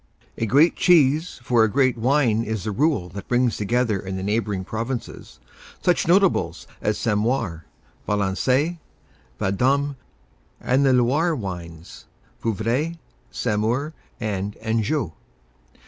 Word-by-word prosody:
A 115 - -2
great 145 +9 +4
cheese 160 -2 +3
for 120 -2 +3
a 110 - +3
great 130 +2 +2
wine 120 -2 +2
is 110 -3 -3
the 110 - -2
rule 135 - +1
that 100 +2 -9
brings 125 -1 +2
together 110 0 0
in 95 0 -5
the 95 - -4
neighboring 105 -2 -1
provinces 115 - -5 0.4
such 180 -3 +2
notables 170 - +2 0.2
as 105 - 0
Sainte 105 -3 0
Maure, 105 -8 -1 0.4
Valençay, 125 - +1 0.6
Vendôme 135 +8 +1 0.6
and 130 +3 +2
the 135 -1 +4
Loire 140 +8 +2
wines 85 - -8 0.4
Vouvray, 115 - -1 0.3
Saumur 120 +7 -1 0.3
and 105 -3 -3
Anjou. 110 - -1
115 Hz, 120 wpm, -23 LUFS, 105-140 Hz, 0.6 s, great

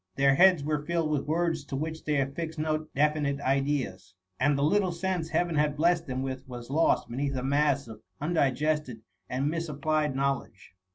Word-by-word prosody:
Their 135 0 +4
heads 180 0 +5
were 150 0 -1
filled 165 -1 -1
with 145 -2 -1
words 165 -1 0
to 140 - -5
which 160 +3 -4
they 150 -2 +1
affixed 160 +4 -3
no 155 0 -1
definite 145 -1 +1
ideas, 135 -9 -1 0.2
and 145 +2 +3
the 140 - +1
little 185 +4 +2
sense 170 -1 -2
Heaven 170 +1 0
had 150 -1 +1
blessed 170 +1 +2
them 130 0 -2
with 130 0 -5
was 120 0 -8
lost 160 +3 +2
beneath 135 +3 -2
a 125 - -2
mass 140 -1 +1
of 110 -1 -10 0.2
undigested 150 -4 0 0.3
and 130 +3 -1
misapplied 155 -2 -1
knowledge. 135 -9 -2
150 Hz, 175 wpm, -28 LUFS, 135-160 Hz, 0.3 s, heads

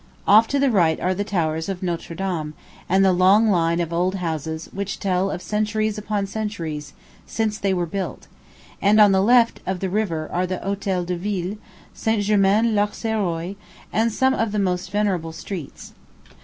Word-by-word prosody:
Off 215 +3 +7
to 280 - 0
the 275 -1 +3
right 170 -7 +3
are 185 - 0
the 200 +2 -2
towers 160 -4 -1
of 190 -1 -4
Notre 170 -1 -3
Dame, 165 -5 -3 0.3
and 195 +1 +4
the 190 - +5
long 195 +5 +5
line 170 -2 +2
of 170 -1 -2
old 180 +3 +1
houses 160 -3 -4
which 200 0 -4
tell 190 -1 0
of 180 - -5
centuries 215 0 -1
upon 210 -1 -2
centuries 165 -8 -5 0.3
since 220 -1 -1
they 200 - 0
were 180 -2 0
built; 190 +3 -5 0.6
and 205 +2 +4
on 205 -2 +7
the 190 0 +3
left 235 +2 +4
of 190 -1 -1
the 190 -1 -3
river 175 -7 -1
are 180 +1 0
the 185 0 -2
Hotel 195 -2 -2
de 180 +1 -2
Ville, 190 +1 -3 0.4
St. 220 -2 0
Germain 210 +2 +3
L'Auxerrois; 205 -4 -1 0.4
and 225 +1 +2
some 265 +4 +2
of 225 -4 -1
the 210 - -2
most 185 -2 -1
venerable 185 -5 -1
streets. 165 -2 -8
195 Hz, 180 wpm, -22 LUFS, 175-210 Hz, 0.6 s, Off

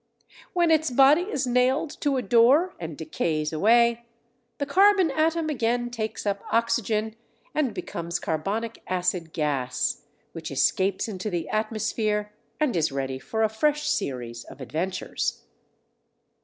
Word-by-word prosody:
When 345 -2 +3
its 315 -1 +3
body 275 +6 +6
is 275 -9 -1
nailed 255 +5 +2
to 285 -2 +1
a 255 - -1
door 245 - +4
and 165 -3 -6
decays 155 -1 -2
away, 235 +6 +3 0.5
the 285 - -1
carbon 380 +2 +4
atom 315 +2 +1
again 240 -4 0
takes 220 -3 -4
up 200 -1 -1
oxygen 220 -1 0 0.4
and 295 -6 +1
becomes 170 -3 -4
carbonic 205 +9 -3
acid 180 -2 -1
gas, 140 -6 -1 0.3
which - - -7
escapes 190 +2 +1
into 205 -1 -4
the 175 -4 -3
atmosphere, 215 -1 -1 0.3
and 300 -9 +1
is 160 -4 +1
ready 135 -1 -3
for 220 +11 -2
a - - +5
fresh 300 +7 0
series 120 - -2
of - - -13
adventures. 165 +8 -3
220 Hz, 135 wpm, -25 LUFS, 170-265 Hz, 0.5 s, body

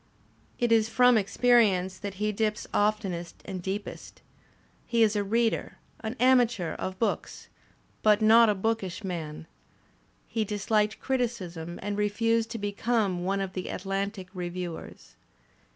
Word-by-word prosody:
It 240 -1 0
is 225 -1 +4
from 250 +1 +5
experience 200 -4 +3
that 200 -1 -5
he 210 +2 0
dips 215 0 -1
oftenest 200 -5 -1
and 185 -1 -5
deepest 195 +3 -6 0.6
He 235 -1 +3
is 215 -1 +3
a 205 - +1
reader, 225 +3 0 0.2
an 220 +1 -5
amateur 240 -8 +3
of 185 0 -5
books, 225 - -2 0.5
but 210 -1 +5
not 225 +1 +6
a 210 - +2
bookish 210 -1 -2
man. 160 -5 -5 0.8
He 225 - -1
disliked 210 +1 0
criticism 185 -10 -3
and 205 0 -2
refused 225 +2 +1
to 230 - -4
become 205 -3 -1
one 195 +1 0
of 190 -1 -4
the 185 - -4
At 185 - -5
lantic 195 -1 -3
reviewers. 175 - -6
205 Hz, 135 wpm, -28 LUFS, 185-225 Hz, 0.8 s, not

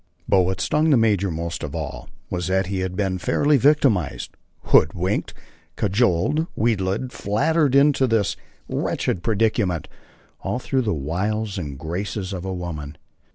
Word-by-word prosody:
But 95 - +4
what 90 +1 -1
stung 150 +11 +2
the 140 - +5
major 105 -4 +2
most 85 0 -4
of - - -5
all - - -5 0.2
was 90 -1 -2
that 95 +1 +1
he 95 +1 -3
had 95 0 -3
been 95 -2 -1
fairly 145 - +2
victimized, 130 - +2 0.3
hoodwinked, - - +2 0.4
cajoled, 105 - +1
wheedled, 110 +2 0
flattered 140 +8 +1
into 140 -1 +4
this 115 -4 +1 0.3
wretched 90 - -1
predicament, 105 -6 0 0.5
all - - -2
through 130 +1 0
the 110 -4 -1
wiles 100 +7 -2
and 70 -5 -5
graces 95 +5 -4
of 90 -1 -5
a 95 - -3
woman. 80 -5 -5
100 Hz, 145 wpm, -23 LUFS, 90-120 Hz, 0.5 s, the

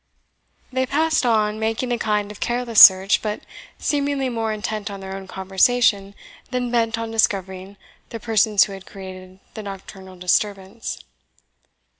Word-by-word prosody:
They 260 0 0
passed 315 -1 +1
on, 215 -2 +1
making 225 +3 -2
a 240 - -1
kind 210 -2 -1
of 210 - -12
careless 240 -2 +2
search, 190 +1 +8
but 210 -1 -4 0.4
seemingly 280 -2 -1
more 225 -2 -2
intent 215 0 -4
on 200 -1 -7
their 190 0 -7
own 195 0 -8
conversation 195 +1 +1 0.3
than 250 -1 -2
bent 230 -1 +1
on 230 0 -4
discovering 195 -3 -1 0.3
the 230 - -7
persons 215 -2 +3
who 200 - -5
had 195 -1 -11
created 185 -1 -11
the 220 - -7
nocturnal 195 -1 -10
disturbance. 195 +3 -2
210 Hz, 145 wpm, -21 LUFS, 195-235 Hz, 0.4 s, search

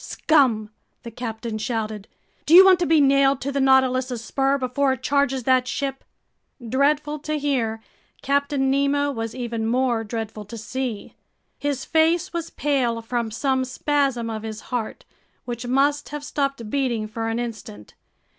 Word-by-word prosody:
"Scum!" 245 -9 +2 0.3
the 235 - -8
captain 225 -1 -5
shouted. 220 -3 -3 0.4
"Do 325 - +6
you 380 +2 +11
want 375 -2 +6
to 350 - 0
be 320 -1 +4
nailed 275 -1 +4
to 280 - -2
the 280 0 0
Nautilus's 260 -2 +2
spur 275 0 +1
before 265 +1 0
it 260 0 -8
charges 275 -2 +1
that 255 0 +3
ship?" 270 +1 -3 0.6
Dreadful 295 +4 +1
to 305 +1 -3
hear, 240 -7 -1 0.4
Captain 280 -1 +1
Nemo 280 +1 +1
was 225 -3 -5
even 235 -3 -3
more 240 -1 +1
dreadful 220 -1 -5
to 230 +4 -9
see. 235 0 -5 0.5
His 285 -2 -2
face 330 +4 +2
was 335 -1 -3
pale 260 -6 0
from 235 0 -2
some 260 +4 0
spasm 265 -2 0
of 220 -1 -4
his 220 -1 -6
heart, 230 -3 -3 0.4
which 240 0 -5
must 285 +3 +1
have 295 0 -6
stopped 275 -5 -2
beating 245 -6 -1
for 225 +1 -4
an 225 - -2
instant. 215 - -7
260 Hz, 155 wpm, -23 LUFS, 230-280 Hz, 0.6 s, you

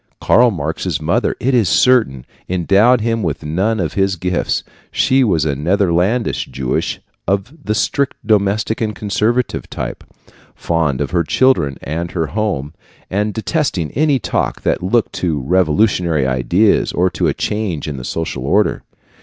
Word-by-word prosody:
Karl 120 +1 +4
Marx's 80 -3 -3
mother, 85 +10 0
it 130 +2 0
is 115 -8 +3
certain, 110 - +3 0.2
endowed 100 +7 +3
him 115 0 0
with 80 -5 -3
none 95 +8 0
of 85 -5 -2
his 95 -1 +1
gifts. 90 -1 -1 0.3
She 130 0 +2
was 85 -9 +1
a 70 -3 0
Netherlandish 95 - +1
Jewess 65 -2 -2 0.3
of 100 - -1
the 105 - -1
strictly 140 +5 0
domestic 105 +1 +1
and 110 -2 -1
conservative 110 +5 -1
type, - - -5 0.5
fond 80 -6 -1
of 70 - -2
her 85 -1 +2
children 80 - +2
and 85 +3 -3
her 80 -3 0
home, 90 -7 -2 0.4
and 105 +3 0
detesting 110 - -1
any 145 0 +2
talk - - -2
that - - 0
looked 105 +5 +1
to 80 -5 -1
revolutionary 85 - +2
ideas 75 - +2
or 90 +1 +1
to - - 0
a - - +1
change 100 -9 -2
in 70 -3 -4
the 65 - -7
social 80 -1 -4
order. 100 +10 +1
95 Hz, 155 wpm, -17 LUFS, 80-110 Hz, 0.5 s, Karl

